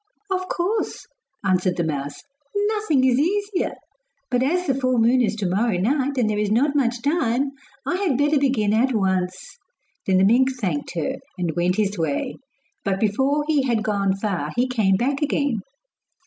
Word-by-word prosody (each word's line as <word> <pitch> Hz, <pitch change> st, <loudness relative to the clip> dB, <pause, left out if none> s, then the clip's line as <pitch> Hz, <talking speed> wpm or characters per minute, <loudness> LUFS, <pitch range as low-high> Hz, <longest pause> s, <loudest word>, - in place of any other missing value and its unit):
'Of 370 Hz, -1 st, -1 dB
course,' 375 Hz, +5 st, -2 dB, 0.4 s
answered 185 Hz, -1 st, +1 dB
the 170 Hz, -, +1 dB
mouse, 145 Hz, -3 st, -4 dB, 0.3 s
'nothing 410 Hz, -9 st, +1 dB
is 260 Hz, -1 st, +3 dB
easier; 400 Hz, +4 st, 0 dB, 0.6 s
but 250 Hz, 0 st, +2 dB
as 355 Hz, +7 st, +1 dB
the 270 Hz, -, +2 dB
full 255 Hz, -1 st, 0 dB
moon 235 Hz, +3 st, +4 dB
is 220 Hz, -2 st, +1 dB
to 215 Hz, -3 st, -3 dB
morrow 200 Hz, +2 st, +1 dB
night, 270 Hz, +7 st, 0 dB
and 240 Hz, -4 st, +2 dB
there 210 Hz, -1 st, 0 dB
is 210 Hz, -1 st, 0 dB
not 275 Hz, +7 st, +2 dB
much 240 Hz, -4 st, 0 dB
time, 275 Hz, -3 st, +1 dB, 0.3 s
I 355 Hz, -, 0 dB
had 365 Hz, -10 st, 0 dB
better 290 Hz, +1 st, +3 dB
begin 245 Hz, -7 st, +1 dB
at 245 Hz, +3 st, +2 dB
once.' 190 Hz, -, -1 dB, 0.5 s
Then 190 Hz, -1 st, +3 dB
the 190 Hz, -, +5 dB
mink 260 Hz, +5 st, +4 dB
thanked 175 Hz, -10 st, -2 dB
her, 165 Hz, -3 st, -2 dB, 0.2 s
and 170 Hz, -4 st, -2 dB
went 175 Hz, +1 st, +1 dB
his 205 Hz, -2 st, 0 dB
way; 150 Hz, -4 st, -2 dB, 0.5 s
but 195 Hz, -1 st, -1 dB
before 265 Hz, +8 st, +1 dB
he 305 Hz, -3 st, +3 dB
had 230 Hz, -3 st, +1 dB
gone 200 Hz, -3 st, +1 dB
far 195 Hz, -8 st, -2 dB
he 245 Hz, +2 st, +2 dB
came 215 Hz, -7 st, +2 dB
back 270 Hz, +8 st, 0 dB
again. 285 Hz, -5 st, 0 dB
240 Hz, 175 wpm, -23 LUFS, 195-285 Hz, 0.6 s, the